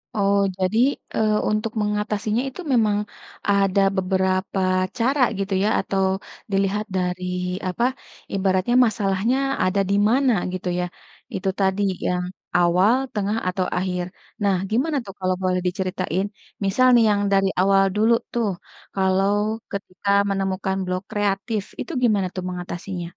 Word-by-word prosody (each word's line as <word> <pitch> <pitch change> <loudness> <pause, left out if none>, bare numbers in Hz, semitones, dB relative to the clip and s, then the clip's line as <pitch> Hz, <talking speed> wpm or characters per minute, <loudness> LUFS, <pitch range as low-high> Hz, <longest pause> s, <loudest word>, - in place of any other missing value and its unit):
Oh, 200 -1 +3 0.2
jadi, 190 +4 0 0.4
eee, 215 -1 +2 0.2
untuk 215 +1 -1
mengatasinya 210 +2 -1
itu 365 - -9
memang 215 -3 +3 0.5
ada 200 -1 +3 0.2
beberapa 190 +1 0 0.4
cara 260 +4 +1 0.2
gitu 195 0 -2
ya, 215 - +3
atau 195 -1 -1 0.5
dilihat 195 +2 +1
dari 180 0 -2 0.4
apa, 185 +6 -1 0.5
ibaratnya 190 +3 +1
masalahnya 215 +3 +1 0.3
ada 185 +2 +1
di 200 - +2
mana, 260 0 +3 0.2
gitu 185 0 -4
ya, 180 - 0 0.5
itu 190 0 -1
tadi 190 +1 +1 0.3
yang 180 0 0 0.3
awal, 180 +6 +4 0.2
tengah 210 +1 -1
atau 185 0 -1
akhir. 180 -1 -1 0.4
Nah, 195 -2 +3
gimana 280 +7 +1
tuh 195 - -8
kalau 185 0 0
boleh 180 -1 +1
diceritain, 185 0 -1 0.4
misal 255 +7 +3
nih 235 - +6
yang 205 0 +1
dari 195 0 +4
awal 195 0 +4
dulu 220 +2 +4 0.2
tuh, 230 -4 +1 0.5
kalau 190 +1 +2 0.4
ketika 200 0 -5 0.2
menemukan 190 0 -1
blok 185 +1 -2
kreatif, 205 +1 -1 0.2
itu - - -6
gimana 205 -5 +3
tuh 185 - -3
mengatasinya? 180 0 -5
195 Hz, 135 wpm, -23 LUFS, 185-210 Hz, 0.5 s, nih